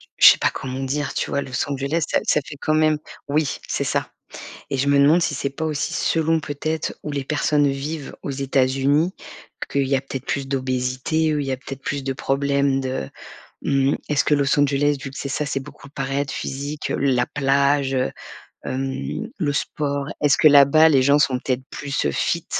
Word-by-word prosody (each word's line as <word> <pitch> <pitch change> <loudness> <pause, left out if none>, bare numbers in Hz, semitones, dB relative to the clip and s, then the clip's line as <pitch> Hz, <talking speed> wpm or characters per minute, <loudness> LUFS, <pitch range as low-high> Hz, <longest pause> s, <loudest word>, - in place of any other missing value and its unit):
j - - -22
je - - +8
sais - - -4
pas - - +2
comment 130 0 -5
dire, 140 +2 -2
tu - - -2
vois? 140 - 0
Los 130 0 -3
Angeles, 140 +4 -1
ça - - +2
ça 150 - +3
fait 145 - -9
quand 155 - +1
même 155 -1 +3 0.3
oui, 150 0 0
c'est - - -1
ça - - -1 0.6
et 135 - -2
je 135 +2 0
me 140 0 +4
demande 150 +5 +5
si 160 - 0
c'est 140 0 -2
pas 150 +4 -5
aussi 150 -2 -2
selon 160 0 +1
peut 145 -2 -6
être 155 0 -2
où 150 - -4
les 140 -1 -2
personnes 145 0 +2
vivent 140 +2 -4
aux - - -4
États-Unis, 135 +5 +1 0.6
qu'il 140 -1 +1
y 135 - +1
a - - -1
peut 135 0 -7
être 130 - -7
plus 135 -1 -2
d'obésité, 130 +4 0
heu, 150 - 0
il 140 - -3
y 135 - -1
a - - -1
peut 130 - -12
être 135 - -21
plus 140 -1 -2
de 135 - -1
problèmes 140 +1 0
de 130 - -3 0.5
mmh 135 0 +2
mh, - - 0
est 150 - 0
ce - - +5
que 150 - +3
Los 140 0 +2
Angeles, 145 +1 +2
vu 135 - -5
que 135 - -10
c'est 140 - -4
ça, 145 +2 -2
c'est 140 - -1
beaucoup 135 +1 -12
paraître, 140 +1 -2
physique, 145 +3 -4
heu, - - -1
la 130 -3 +2
plage, 140 0 +1
heu, 130 0 0 0.5
hem, 135 - -3
le 150 -6 0
sport. 140 -1 -2
Est 145 - +4
ce - - +4
que, 155 - +6
là 140 -1 +8
bas, 155 +3 +5
les 135 -4 +4
gens 140 +2 +4
sont 130 -3 +2
peut 130 - -1
être 130 +1 -5
plus, 140 -1 -3
heu, - - 0
fit - - -1
140 Hz, 230 wpm, -22 LUFS, 135-150 Hz, 0.6 s, je